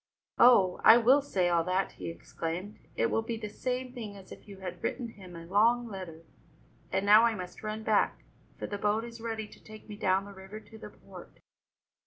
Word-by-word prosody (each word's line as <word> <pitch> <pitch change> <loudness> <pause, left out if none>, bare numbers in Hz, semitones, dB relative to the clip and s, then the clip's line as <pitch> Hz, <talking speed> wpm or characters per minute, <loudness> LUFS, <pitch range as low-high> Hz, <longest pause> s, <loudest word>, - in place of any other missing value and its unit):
"Oh, 200 -7 +6
I 225 - +9
will 255 +5 +5
say 190 -10 0
all 170 -1 +2
that!" 185 +1 0
he - - -7
exclaimed. 170 +4 -6 0.2
"It 115 - +1
will 225 - +1
be 225 0 -4
the 215 -1 -6
same 250 +2 -3
thing 215 -5 -7
as 190 -1 -15
if - - -12
you 200 -1 -11
had 180 -2 -7
written 245 -3 -3
him 185 -5 -13
a 165 0 -9
long 225 +6 +3
letter. 185 -6 -8 0.7
And 190 - 0
now 210 +2 +7
I 230 -1 +3
must 180 -2 -8
run 215 0 -5
back, 215 -1 +1 0.3
for - - -5
the 205 - -5
boat 210 +2 +1
is 230 -1 -10
ready 225 -2 -4
to - - -18
take 215 0 -13
me 210 - -8
down 195 -2 +1
the 200 - -11
river 190 +2 -10
to 220 0 -15
the - - -9
port." - - -14
210 Hz, 215 wpm, -30 LUFS, 185-225 Hz, 0.7 s, I